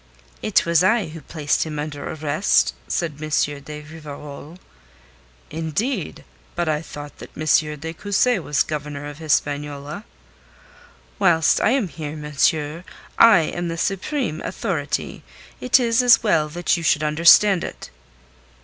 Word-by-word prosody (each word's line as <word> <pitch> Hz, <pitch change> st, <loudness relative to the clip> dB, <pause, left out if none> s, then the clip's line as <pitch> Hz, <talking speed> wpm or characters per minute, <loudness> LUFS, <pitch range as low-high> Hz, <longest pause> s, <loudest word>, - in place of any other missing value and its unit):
"It 210 Hz, -, +2 dB
was 170 Hz, 0 st, +3 dB
I 210 Hz, -3 st, +2 dB
who 160 Hz, 0 st, -9 dB
placed 150 Hz, 0 st, -1 dB
him 155 Hz, -2 st, -3 dB
under 145 Hz, -1 st, -5 dB
arrest," 155 Hz, +4 st, +1 dB
said 155 Hz, -4 st, -3 dB
M. 155 Hz, -, -5 dB, 0.3 s
de 150 Hz, +1 st, -9 dB
Rivarol. 150 Hz, 0 st, -10 dB, 0.9 s
"Indeed! 165 Hz, -, -3 dB, 0.3 s
But 175 Hz, -1 st, -1 dB
I 155 Hz, -1 st, 0 dB
thought 145 Hz, -2 st, -10 dB
that -, -, -10 dB
M. 150 Hz, -1 st, +1 dB
de 160 Hz, +2 st, -6 dB
Cussy 205 Hz, +6 st, +1 dB
was 150 Hz, -4 st, 0 dB
Governor 145 Hz, -1 st, -5 dB
of 145 Hz, 0 st, -8 dB
Hispaniola." 145 Hz, +2 st, -2 dB, 1.2 s
"Whilst 170 Hz, -5 st, +3 dB
I -, -, +3 dB
am 250 Hz, -4 st, +1 dB
here, 155 Hz, -2 st, -7 dB
monsieur, 150 Hz, +2 st, 0 dB, 0.4 s
I 230 Hz, -7 st, +8 dB
am 175 Hz, +2 st, -3 dB
the 165 Hz, 0 st, -4 dB
supreme 195 Hz, -, -2 dB
authority. -, -, -3 dB, 0.4 s
It 250 Hz, +2 st, +4 dB
is 235 Hz, -1 st, +2 dB
as 245 Hz, -2 st, +5 dB
well 160 Hz, -8 st, +2 dB
that 175 Hz, +3 st, 0 dB
you 170 Hz, -, -4 dB
should 155 Hz, -1 st, +2 dB
understand 170 Hz, +5 st, +5 dB
it." -, -, -8 dB
160 Hz, 140 wpm, -22 LUFS, 150-180 Hz, 1.2 s, I